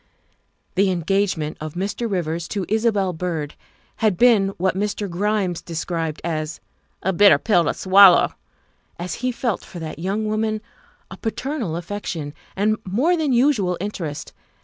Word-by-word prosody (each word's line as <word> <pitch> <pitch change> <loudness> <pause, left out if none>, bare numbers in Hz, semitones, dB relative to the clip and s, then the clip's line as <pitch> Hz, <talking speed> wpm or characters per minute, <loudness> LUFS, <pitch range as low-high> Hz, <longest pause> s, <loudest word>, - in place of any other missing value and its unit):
The 195 +1 +3
engagement 175 -3 0
of 155 +1 -6
Mr. 200 +5 -2
Rivers 170 -3 -2
to 200 -3 -3
Isabel 210 -4 +1
Byrd 160 -3 -3 0.4
had 215 -5 +1
been 230 -4 +5
what 185 +1 +1
Mr. 205 +1 -2
Grimes 190 -1 -1
described 165 -1 -3
as 155 -2 -3 0.2
" - - -33
a 190 - +1
bitter 200 +3 +7
pill 175 -6 +2
to - - +1
swallow," 190 -1 +6 0.6
as 175 -1 -4
he 255 0 +1
felt 235 -3 -2
for - - -11
that 160 -2 -6
young 195 +5 -1
woman 215 0 0 0.5
a - - -8
paternal 235 - -3
affection 170 -4 -5 0.2
and 215 +2 +1
more 255 - +2
than 310 -4 0
usual 235 -8 +2
interest. 170 -7 -5
190 Hz, 150 wpm, -22 LUFS, 170-215 Hz, 0.6 s, bitter